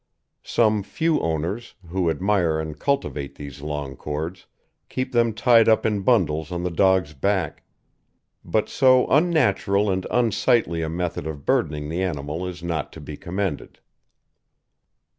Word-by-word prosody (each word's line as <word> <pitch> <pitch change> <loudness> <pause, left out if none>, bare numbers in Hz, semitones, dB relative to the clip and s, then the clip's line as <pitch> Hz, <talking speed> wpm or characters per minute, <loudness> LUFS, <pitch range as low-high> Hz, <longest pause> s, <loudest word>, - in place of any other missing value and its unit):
Some 110 -2 +2
few 160 +10 0
owners, 80 +8 -3
who 90 -1 0
admire 85 -1 +1
and 80 -1 -5
cultivate 135 - -2
these 70 -1 -9
long 75 -2 -4
cords, 75 +7 -5 0.4
keep 130 0 -3
them 120 -2 +3
tied 115 +1 +5
up 110 - +3
in 105 -2 +1
bundles 80 -9 +1
on 90 0 -3
the 90 - -1
dog's 95 -3 +2
back, 90 +2 -1 0.8
but 110 - 0
so 130 -1 +4
unnatural 105 - +2
and 95 0 -2
unsightly 115 -6 +2
a 80 - -2
method 85 -2 -3
of 75 -3 -7
burdening 75 -1 0
the 85 +3 -2
animal 80 0 -3
is 90 -1 -8
not 85 -4 -3
to - - -10
be 75 0 -8
commended. 95 -1 -4
90 Hz, 140 wpm, -23 LUFS, 80-110 Hz, 0.8 s, tied